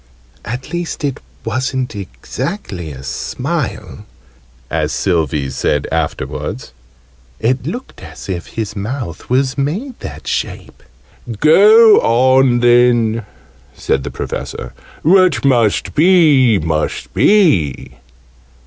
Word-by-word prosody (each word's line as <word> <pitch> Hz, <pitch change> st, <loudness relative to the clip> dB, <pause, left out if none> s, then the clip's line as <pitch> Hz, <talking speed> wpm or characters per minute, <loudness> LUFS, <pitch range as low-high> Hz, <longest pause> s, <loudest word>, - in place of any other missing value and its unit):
("At 125 Hz, +8 st, -6 dB
least 175 Hz, -3 st, -4 dB
it 140 Hz, -3 st, -2 dB, 0.3 s
wasn't 130 Hz, +1 st, -2 dB
exactly 100 Hz, -, -6 dB
a 65 Hz, -1 st, -10 dB
smile,") 65 Hz, +1 st, -4 dB, 0.6 s
as 75 Hz, +2 st, -1 dB
Sylvie 75 Hz, -4 st, -1 dB
said 70 Hz, +1 st, -1 dB
afterwards: 80 Hz, -4 st, -4 dB, 0.7 s
"it 125 Hz, +4 st, 0 dB
looked 245 Hz, +10 st, -7 dB
as -, -, -11 dB
if 90 Hz, -3 st, -4 dB
his 110 Hz, -2 st, -5 dB
mouth 105 Hz, -, -5 dB
was 130 Hz, +2 st, +1 dB
made 205 Hz, -, -3 dB
that -, -, -8 dB
shape." -, -, -4 dB, 0.6 s
"Go 210 Hz, +8 st, +7 dB
on 130 Hz, +1 st, +3 dB
then," 120 Hz, -2 st, +3 dB, 0.5 s
said 65 Hz, -, -1 dB
the -, -, -4 dB
Professor. -, -, -6 dB, 0.3 s
"What 185 Hz, -2 st, +4 dB
must 120 Hz, -6 st, +2 dB
be 150 Hz, -, +5 dB
must 80 Hz, -2 st, -2 dB
be." 155 Hz, -, +2 dB
120 Hz, 105 wpm, -16 LUFS, 90-150 Hz, 0.7 s, Go